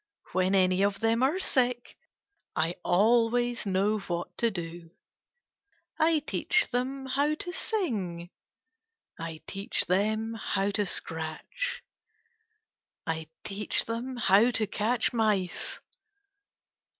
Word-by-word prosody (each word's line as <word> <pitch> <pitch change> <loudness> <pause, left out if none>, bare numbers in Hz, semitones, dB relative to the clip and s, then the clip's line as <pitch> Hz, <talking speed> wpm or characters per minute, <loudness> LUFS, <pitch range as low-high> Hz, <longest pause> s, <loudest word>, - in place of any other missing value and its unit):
When 185 +2 +2
any 185 0 +3
of 200 0 +1
them 225 +1 +2
are 275 +7 +3
sick 250 -9 0 0.6
I 160 +2 +1
always 235 +5 +2
know 200 +3 +2
what 175 -3 -4
to 235 - +3
do. 170 -3 -6 1.1
I 320 0 +4
teach 430 +5 +2
them 265 +2 -2
how 285 +3 +1
to 355 - -6
sing. 205 - -3 0.9
I 165 -1 -6
teach 195 +1 -1
them 215 +4 +1
how 205 -2 -1
to 205 0 0
scratch. 165 - -3 1.2
I 160 -1 -2 0.2
teach 205 +1 0
them 240 +3 -4
how 215 +1 +5
to 225 -3 +1
catch 220 +4 +1
mice. 210 -6 0
215 Hz, 110 wpm, -29 LUFS, 185-245 Hz, 1.2 s, how